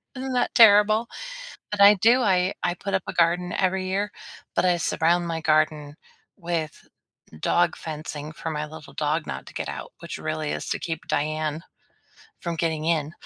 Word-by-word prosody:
Isn't 260 +1 -4
that 245 - 0
terrible? 215 0 +6 0.6
But 205 -1 -1
I 205 +1 +9
do. 235 +6 +4
I 185 -3 +2
I 175 0 0
put 200 +2 -5
up 190 - +2
a - - -4
garden 175 +1 +2
every 185 0 0
year, 200 +2 -1 0.4
but - - +2
I 180 -1 +3
surround 170 +2 +1
my 165 -1 -3
garden 155 -1 +1 0.4
with 170 -3 -4 0.5
dog 175 -1 +2
fencing 155 -1 -6
for 160 - -6
my 150 -1 -2
little 150 -2 -12
dog 155 +1 -1
not - - -5
to - - -13
get - - -4
out, - - -7
which - - -6
really 155 -1 -3
is - - -4
to - - 0
keep 160 -2 -4
Diane 155 +1 -1 0.8
from 170 -1 -3
getting 160 -1 -1
in. 155 -2 0
170 Hz, 175 wpm, -25 LUFS, 155-190 Hz, 0.8 s, I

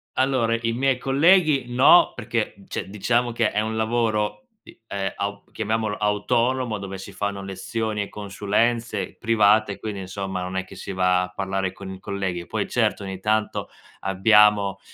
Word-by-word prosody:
Allora, 130 -3 +2
i 115 0 0
miei 130 +2 +1
colleghi 145 +2 +4
no, 125 +8 +6
perché, 115 -2 -2
cioè - - -5
diciamo 120 +4 0
che 115 -1 +1
è 105 - 0
un 110 +1 -3
lavoro, 110 -2 0 0.2
i - - -15
ehm, 95 -2 -3
aup 100 0 -5
chiamiamolo 110 -1 -1
autonomo, 115 +3 0
dove 95 -1 -6
si 95 - -10
fanno 100 -1 -3
lezioni 105 +3 -3
e 100 - -4
consulenze 105 +4 -1
private, 110 -2 +3
quindi, 105 -3 -5
insomma, 95 0 -4
non 90 +1 -4
è 95 - -2
che - - -13
si - - -7
va 90 -1 +2
a 90 - -5
parlare 95 0 -2
con 95 0 -10
i 95 - -10
colleghi. 95 -3 -3
Poi, - - -2
certo, - - 0
ogni 95 -1 -6
tanto 110 +1 0 0.3
abbiamo 100 0 +4
105 Hz, 165 wpm, -23 LUFS, 95-115 Hz, 0.3 s, no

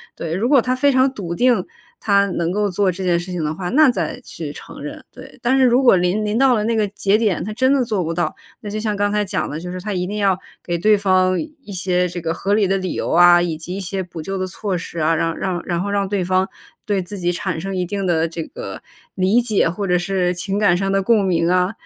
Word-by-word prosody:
对， 165 -1 -4
如 210 +8 0
果 280 -2 +6
他 255 0 0
非 280 +2 +3
常 260 0 +3
笃 175 -8 -5
定 240 -3 +3 0.4
他 200 -1 +3
能 170 -2 -1
够 205 +1 0
做 190 0 +1
这 185 +2 -6
件 175 -2 +2
事 180 +2 -7
情 175 -3 -3
的 150 +1 -2
话， 175 +1 -4
那 300 +3 +5
再 245 - -2
去 - - -7
承 - - -11
认， - - -7
对。 - - -13
但 255 +3 +2
是 265 - +4
如 245 +1 +4
果 245 -6 +6
临 180 +4 +1
临 210 +1 -1
到 265 0 +5
了 215 -3 +1
那 230 +1 +1
个 215 -2 +1
节 200 0 +1
点， 215 -5 0
他 215 - -5
真 260 +4 +2
的 275 -2 +2
做 210 -6 -1
不 165 0 -2
到， 165 -2 -1 0.2
那 210 - -7
就 215 +1 -3
像 215 -1 -1
刚 205 0 0
才 210 0 0
讲 190 -1 -2
的， 150 - -5
就 180 +2 -6
是 185 0 -6
他 210 +3 -4
一 180 -1 -1
定 205 +3 -4
要 195 -3 +2 0.3
给 175 -1 -2
对 210 +5 +4
方 185 -2 +2
一 300 -7 -11
些 180 0 0
这 175 0 -6
个 165 0 -2
合 200 - -1
理 210 -2 +3
的 195 +1 +1
理 185 -1 -3
由 - - -3
啊， 175 +1 +6
以 170 -2 -2
及 175 +3 -6
一 - - -4
些 190 0 -3
补 175 -2 -8
救 195 +5 -4
的 185 - -1
措 185 +1 -3
施 170 0 -7
啊， 160 +1 +2
让 165 +1 -1
让 185 -2 -2
然 175 -1 -1
后 200 - -3
让 200 -1 0
对 195 -1 -1
方 185 +1 +1 0.4
对 200 -2 0
自 185 +3 -8
己 175 -1 0
产 175 -1 -3
生 195 +3 -4
一 180 - 0
定 195 +2 -3
的 165 -2 +1
这 165 0 -5
个 - - -8 0.3
理 195 +5 +3
解， 220 -7 +1
或 195 +4 -3
者 180 -1 +3
是 180 0 0
情 190 +4 -2
感 200 -4 +4
上 195 +1 -1
的 195 0 +2
共 210 0 +3
鸣 170 -2 +1
啊。 180 +1 +2
190 Hz, 295 characters per minute, -20 LUFS, 175-210 Hz, 0.4 s, 果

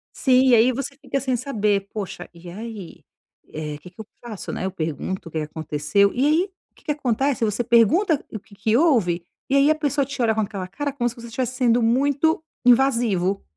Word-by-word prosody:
Sim, 260 -1 +4
e 245 - +7
aí 235 +3 +5
você 275 +2 -5
fica 275 -1 -2
sem 260 -1 -1
saber: 210 -6 0
"Poxa, 195 -4 -6
e 170 +1 -12
aí, 210 -1 -8 0.5
eh, 150 -1 -5
que 180 +4 -13
que 180 - -29
eu - - -10 0.2
faço, 215 -5 -6
né, - - -4
eu 190 - -2
pergunto 165 +1 -4
o - - -20
que - - -4
que - - -2
aconteceu?". 155 +5 0
E 255 +3 +1
aí, 310 +4 +3 0.3
o - - -50
que - - -23
que - - 0
acontece, 270 -2 0
você 210 +3 -1
pergunta 270 - +3
o 215 - -5
que 200 0 -19
que 215 +3 +1
houve, 220 - +2 0.3
e 270 - +2
aí 280 +1 +5
a 310 - +4
pessoa 290 -2 0
te 270 -1 -5
olha 225 -2 +3
com 220 - +1
aquela 200 -3 -4
cara, 285 +9 -3
como 255 -3 -1
se 235 - -10
você 235 0 -10
estivesse 250 +2 -3
sendo 245 -2 +3
muito 280 +7 +2 0.2
invasivo. 230 -7 +3
230 Hz, 220 wpm, -23 LUFS, 195-270 Hz, 0.5 s, e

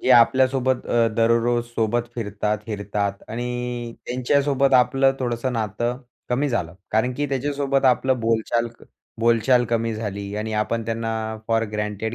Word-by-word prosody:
की - - 0
आपल्यासोबत 130 +1 +4
अ, 115 -1 +3
दररोजसोबत 115 0 +1
फिरतात, 105 -1 -2
हीरतात 100 -2 -3
आणि 120 0 -4
त्यांच्यासोबत 135 +2 +2
आपलं 135 +2 +4
थोडंसं 125 0 -2
नातं 120 +2 -2 0.3
कमी 135 +4 +1
झालं. 85 -10 -2 0.2
कारण, 115 +4 +1
की 145 +3 -1
त्याच्यासोबत 140 0 0
आपलं 130 -1 +3
बोलचाल 115 +1 +1
क - - -22 0.4
बोलचाल 120 +2 +4
कमी 115 -1 0
झाली 100 -2 -5
आणि 110 +1 -3
आपण 115 +1 -1
त्यांना 115 0 -2 0.4
फोर 115 0 +2
ग्रँटेड 105 +1 -3
120 Hz, 135 wpm, -23 LUFS, 110-130 Hz, 0.4 s, आपल्यासोबत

